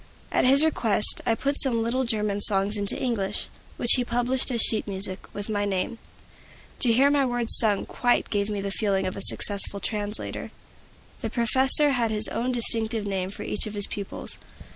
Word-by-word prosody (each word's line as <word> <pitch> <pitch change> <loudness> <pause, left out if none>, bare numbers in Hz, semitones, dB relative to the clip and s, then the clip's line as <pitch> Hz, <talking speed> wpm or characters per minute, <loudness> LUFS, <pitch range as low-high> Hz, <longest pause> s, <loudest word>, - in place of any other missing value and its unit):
At - - +1
his 275 +3 +6
request, 225 -9 +4
I 225 - +2
put 280 +4 +1
some 235 -4 +2
little 255 +3 -2
German 210 -3 -2
songs 200 0 +2
into 200 -1 +3
English, 210 -5 -3 0.3
which 240 - +4
he 250 - 0
published 245 +2 -1
as 240 -2 -2
sheet 220 -1 +1
music, 190 -1 -2
with 205 0 -6
my 205 -2 -2
name. 200 +3 -3 0.8
To 240 - +3
hear 270 +5 +3
my 285 -1 +2
words 245 -2 -1
sung 210 -3 0
quite 245 -1 -1
gave 205 0 -1
me 205 -1 -4
the 200 0 -4
feeling 195 -2 -1
of 185 - -4
a - - -7
successful 200 0 +1
translator. 210 0 -5 0.7
The - - -4
professor 265 +5 +2
had 240 -4 0
his 215 0 +1
own 240 +3 -3
distinctive 225 -2 +1
name 190 -2 -3
for 195 - -9
each 210 - -2
of 215 - -8
his 205 -1 +2
pupils. 200 -2 -7
220 Hz, 185 wpm, -24 LUFS, 200-245 Hz, 0.8 s, his